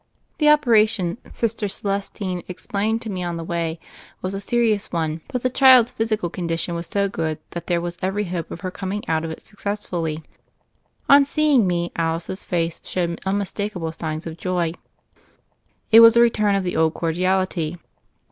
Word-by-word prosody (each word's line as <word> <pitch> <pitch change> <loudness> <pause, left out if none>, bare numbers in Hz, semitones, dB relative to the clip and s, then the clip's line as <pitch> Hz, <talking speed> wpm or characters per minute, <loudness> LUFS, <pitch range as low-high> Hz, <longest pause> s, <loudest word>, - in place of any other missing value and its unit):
The 300 -1 +5
operation. 225 - +3
Sister 225 -2 -1
Celestine 195 -2 -3
explained 205 +4 -2
to 225 - -6
me 185 -2 -4
on 175 -1 -3
the 165 - -5
way, 165 -1 -3 0.4
was 185 +1 -2
a 195 - -4
serious 225 -1 +1
one; 160 -2 -2
but 250 - -4
the 255 - +2
child's 255 -2 +6
physical 220 -5 -1
condition 170 -1 -2
was 170 0 -4
so 200 0 0
good 160 -5 -2
that 170 - -7
there 175 -1 +1
was 175 0 -5
every 195 +3 -1
hope 175 -4 -4
of - - -8
her 185 -2 -4
coming 200 +2 -5
out 160 0 0
of 165 - -3
it 160 - -9
successfully. 180 -7 -4 0.8
On 280 0 +8
seeing 285 -6 +3
me 175 -1 -1
Alice's 165 +3 -1
face 165 -2 -2
showed 170 -2 -2
unmistaka 200 0 -2
ble 165 -1 -3
signs 155 -1 -5
of 165 -1 -6
joy. 175 -3 -1 1.2
It 225 - +9
was 230 0 +8
a - - +7
return 215 -4 +3
of 195 - 0
the 180 - -3
old 160 0 +2
cordiality. 175 -1 0
185 Hz, 175 wpm, -22 LUFS, 170-215 Hz, 1.2 s, It